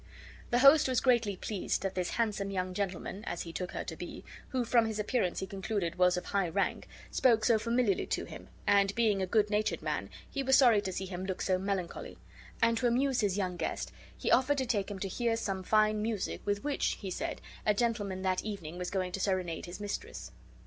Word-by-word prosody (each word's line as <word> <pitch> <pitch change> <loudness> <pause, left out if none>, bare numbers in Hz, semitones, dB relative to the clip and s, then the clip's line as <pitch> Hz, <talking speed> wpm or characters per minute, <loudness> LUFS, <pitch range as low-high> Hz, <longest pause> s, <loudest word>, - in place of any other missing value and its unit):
The 240 - +2
host 280 +4 +7
was 255 -2 +2
greatly 235 -6 +2
pleased 195 +1 -2
that 195 -1 -1
this 180 -1 -1
handsome 210 -4 -1
young 185 -1 -2
gentleman 195 +1 -3
(as 175 - -3
he 165 - -8
took 180 0 -4
her - - -3
to - - -6
be), - - -8 0.2
who 255 -2 -1
from 230 -1 +4
his 220 -1 -3
appearance 210 -3 0
be - - -2
concluded 195 -3 -2
was 180 0 +4
of 180 - -4
high 195 -3 0
rank, 195 +4 -1 0.2
spoke 230 -4 +3
so 230 -3 +4
familiarly 230 -3 +1
to - - -1
him, - - -10 0.2
and, 200 -1 +3
being 215 -4 +2
a 190 - 0
good 210 +1 +2
natured 210 +1 0
man, - - -2 0.2
he 275 - -3
was 265 0 +4
sorry 235 -7 +6
to 190 - -3
see 190 +1 -3
him 185 -1 -5
look 190 - -3
so 185 -1 +1
melancholy; 190 -2 -3 0.5
and 230 0 +3
to 245 - +2
amuse 255 +2 +2
his 200 -2 +1
young 185 -3 -1
guest 165 - -3 0.3
he - - -1
offered 280 +2 +4
to 260 - 0
take 210 -5 0
him 205 - -5
to 195 - -3
hear 230 +4 0
some 195 -4 -2
fine 215 +2 +3
music, 215 -3 -2
with 205 0 -1
which, 290 -1 0
he 195 -3 -6
said, - - -3 0.2
a 210 - +3
gentleman 205 -5 -1
that 185 -1 +1
evening 180 -5 -6
was 180 - -3
going 185 -2 -1
to 195 - -4
serenade 185 -4 -1
his 175 +3 -7
mistress. 205 -1 -5
205 Hz, 220 wpm, -31 LUFS, 185-230 Hz, 0.5 s, host